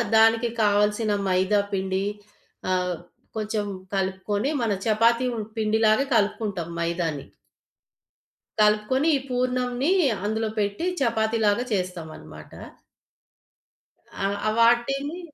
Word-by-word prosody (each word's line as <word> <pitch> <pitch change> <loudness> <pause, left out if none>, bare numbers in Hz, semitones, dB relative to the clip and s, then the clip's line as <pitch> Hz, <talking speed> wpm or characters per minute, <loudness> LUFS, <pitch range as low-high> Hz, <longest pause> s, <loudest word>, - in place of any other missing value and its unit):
దానికి 225 +1 +5
కావాల్సిన 210 +1 +2 0.2
మైదా 190 +3 +2
పిండి 190 0 -1 0.7
ఆహ్, 180 -1 0 0.4
కొంచెం 215 -1 -2 0.3
కలుపుకొని 195 +5 -1
మన 225 -3 0
చపాతీ 230 +3 +3
ఉం 220 - -3 0.2
పిండిలాగా 220 +3 +3
కలుపుకుంటాం 200 -5 0
మైదాని. 170 -4 -2 1.4
కలుపుకొని 210 +7 +2
ఈ - - -4
పూర్ణంని 250 +3 0 0.3
అందులో 220 +1 -1
పెట్టి 205 - -1
చపాతీలాగా 220 -2 +1
చేస్తామన్నమాట. 180 -4 -6 1.7
ఆ! - - +2 0.2
ఆ - - +3
వాటిని 275 +8 +2
215 Hz, 90 wpm, -25 LUFS, 195-235 Hz, 1.7 s, దానికి